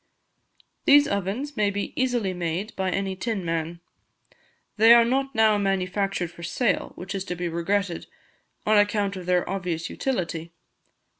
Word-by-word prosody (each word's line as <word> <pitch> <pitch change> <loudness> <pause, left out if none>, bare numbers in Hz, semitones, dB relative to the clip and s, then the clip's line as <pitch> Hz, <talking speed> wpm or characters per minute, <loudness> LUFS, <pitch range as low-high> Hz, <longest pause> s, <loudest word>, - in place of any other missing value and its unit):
These 285 0 +7
ovens 200 +9 -3
may 210 -1 +2
be 200 0 -4
easily 240 -7 0
made 175 +4 -3
by 190 -1 -1
any 195 +1 -2
tin 195 -1 -3
man. 165 +1 -3 0.9
They 225 +2 +8
are 235 -1 +6
not 270 +2 -1
now 220 -2 +4
manufactured 195 -2 -1
for 170 - -13
sale, 195 +7 -1
which 185 +3 -7
is 195 -1 -3
to 180 - -4
be 175 0 -3
regretted, 170 +2 -1 0.6
on 215 0 +5
account 205 -1 +1
of 180 -2 -8
their 180 -1 +2
obvious 175 -4 -3
utility. 170 -9 -3
195 Hz, 150 wpm, -25 LUFS, 175-215 Hz, 0.9 s, They